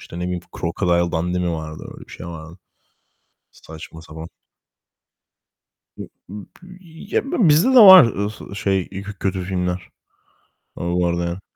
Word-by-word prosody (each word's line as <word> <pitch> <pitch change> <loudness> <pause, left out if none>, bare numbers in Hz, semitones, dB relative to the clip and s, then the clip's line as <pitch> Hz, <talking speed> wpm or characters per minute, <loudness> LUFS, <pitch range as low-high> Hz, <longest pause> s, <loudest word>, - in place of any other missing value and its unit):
İşte, 85 - -10
ne - - -4
bileyim, 90 0 -3 0.2
Crocodile 85 +1 0
Dundee 90 +2 -1
mi 90 -1 -1
vardı, 80 -1 -7
öyle - - -13
bir - - -13
şey - - -9
vardı. 85 +1 -10 0.9
Saçma 80 0 -12
sapan. 80 0 -10 1.7
B - - -8 0.2
b 180 - -12 0.3
ya, - - +2
b - - -13
bilmiyorum 225 - +1
bizde 155 - +4
de 260 - +7
var, 190 - +11
ııı, 105 -2 -5
şey, 95 -3 -1
ııı, 95 +1 -6
k 105 - -8
kötü 95 -1 -2
filmler, 90 -1 -3 0.9
ııı, 85 0 -3
bu 90 0 +1
arada. 85 +1 -3
90 Hz, 155 wpm, -20 LUFS, 85-100 Hz, 1.7 s, var